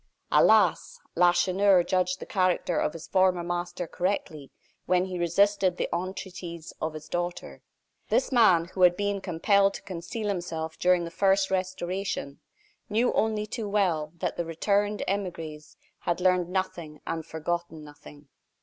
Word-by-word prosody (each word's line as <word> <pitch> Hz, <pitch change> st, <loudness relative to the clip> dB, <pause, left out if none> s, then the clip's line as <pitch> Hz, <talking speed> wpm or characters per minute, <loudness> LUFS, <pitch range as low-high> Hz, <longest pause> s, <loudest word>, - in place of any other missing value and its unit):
Alas! -, -, +4 dB
Lacheneur 180 Hz, +2 st, +4 dB
judged 185 Hz, 0 st, 0 dB
the -, -, -7 dB
character 185 Hz, -3 st, +1 dB
of -, -, 0 dB
his 165 Hz, 0 st, -8 dB
former 185 Hz, -2 st, +2 dB
master 175 Hz, +1 st, -3 dB
correctly, 165 Hz, -5 st, -3 dB, 0.4 s
when 180 Hz, 0 st, +3 dB
he 185 Hz, -1 st, -5 dB
resisted 185 Hz, +1 st, +2 dB
the -, -, -1 dB
entreaties 175 Hz, -2 st, -6 dB
of 160 Hz, 0 st, -2 dB
his 155 Hz, 0 st, -9 dB
daughter. 175 Hz, +1 st, -4 dB, 0.5 s
This -, -, +1 dB
man, 200 Hz, -10 st, +5 dB
who 185 Hz, -, -4 dB
had 180 Hz, -1 st, +6 dB
been 205 Hz, -1 st, -1 dB
compelled 195 Hz, +3 st, +2 dB
to -, -, -9 dB
conceal 195 Hz, +5 st, -5 dB
himself 165 Hz, -4 st, -3 dB
during 180 Hz, -1 st, +3 dB
the 170 Hz, -, -7 dB
first 195 Hz, +1 st, +2 dB
Restoration, 185 Hz, -5 st, -3 dB, 0.5 s
knew 225 Hz, +4 st, +2 dB
only 215 Hz, -1 st, 0 dB
too 215 Hz, 0 st, -5 dB
well, 175 Hz, -7 st, +1 dB
that -, -, -3 dB
the 170 Hz, -, 0 dB
returned 200 Hz, +5 st, 0 dB
emigres 165 Hz, -6 st, -4 dB, 0.2 s
had 175 Hz, -, -1 dB
learned 180 Hz, -1 st, +2 dB
nothing 175 Hz, -5 st, -3 dB
and 165 Hz, -1 st, -3 dB
forgotten 160 Hz, 0 st, -4 dB
nothing. 145 Hz, 0 st, -14 dB
180 Hz, 145 wpm, -27 LUFS, 170-195 Hz, 0.5 s, had